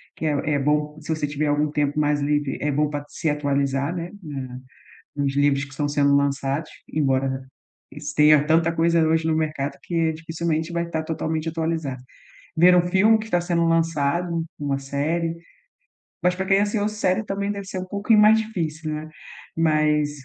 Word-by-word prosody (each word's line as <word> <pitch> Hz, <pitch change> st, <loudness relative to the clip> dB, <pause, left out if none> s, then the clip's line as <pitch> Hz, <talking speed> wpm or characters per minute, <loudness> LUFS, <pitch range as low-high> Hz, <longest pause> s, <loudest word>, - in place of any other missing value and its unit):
que -, -, -5 dB
é 155 Hz, -, +2 dB, 0.2 s
é -, -, +1 dB
bom 150 Hz, +2 st, 0 dB
se 155 Hz, -, -13 dB
você 155 Hz, -2 st, -2 dB
tiver 145 Hz, +1 st, -2 dB
algum 145 Hz, +1 st, +1 dB
tempo 145 Hz, 0 st, 0 dB
mais 145 Hz, -1 st, +1 dB
livre, 145 Hz, -1 st, 0 dB
é 150 Hz, -, 0 dB
bom 150 Hz, +1 st, +1 dB
pra 145 Hz, -1 st, -4 dB
se 160 Hz, -, -2 dB
atualizar, 140 Hz, +1 st, 0 dB
né, 175 Hz, +1 st, -5 dB
na 135 Hz, -4 st, -6 dB, 0.6 s
nos 140 Hz, -1 st, -1 dB
livros 140 Hz, -1 st, +2 dB
que 140 Hz, -, -16 dB
estão 145 Hz, +2 st, -2 dB
sendo 140 Hz, -1 st, +3 dB
lançados, 140 Hz, +2 st, 0 dB, 0.2 s
embora 135 Hz, -2 st, 0 dB, 0.7 s
tenha 150 Hz, -1 st, +6 dB
tanta 165 Hz, +2 st, +3 dB
coisa 165 Hz, 0 st, +2 dB
hoje 160 Hz, 0 st, +1 dB
no 160 Hz, -1 st, +1 dB
mercado 155 Hz, -3 st, -2 dB
que 165 Hz, +1 st, 0 dB
dificilmente 160 Hz, 0 st, -3 dB
vai 170 Hz, 0 st, -2 dB
tá 160 Hz, -1 st, -2 dB
totalmente 160 Hz, 0 st, -2 dB
atualizado. 160 Hz, -5 st, -3 dB, 0.5 s
Ver 180 Hz, +2 st, +6 dB
um 175 Hz, -, +4 dB
filme 205 Hz, +5 st, +5 dB
que 220 Hz, -, -6 dB
está 175 Hz, -5 st, +1 dB
sendo 170 Hz, -1 st, 0 dB
lançado, 165 Hz, +1 st, 0 dB
uma 140 Hz, -2 st, -1 dB
série, 160 Hz, +5 st, -2 dB, 0.9 s
mas 180 Hz, 0 st, +3 dB
pra 190 Hz, +1 st, -3 dB
quem 195 Hz, 0 st, +4 dB
é 200 Hz, -, +3 dB
ansioso, 210 Hz, 0 st, -1 dB
série 200 Hz, -1 st, +1 dB
também 200 Hz, 0 st, -2 dB
deve 200 Hz, -1 st, -7 dB
ser 190 Hz, -, -5 dB
um 185 Hz, -, -4 dB
pouquinho 205 Hz, +3 st, +2 dB
mais 215 Hz, +1 st, +6 dB
difícil, 160 Hz, -8 st, -3 dB
né. 155 Hz, +1 st, -6 dB, 0.5 s
Mas 155 Hz, -2 st, +2 dB
155 Hz, 180 wpm, -23 LUFS, 145-170 Hz, 0.9 s, tenha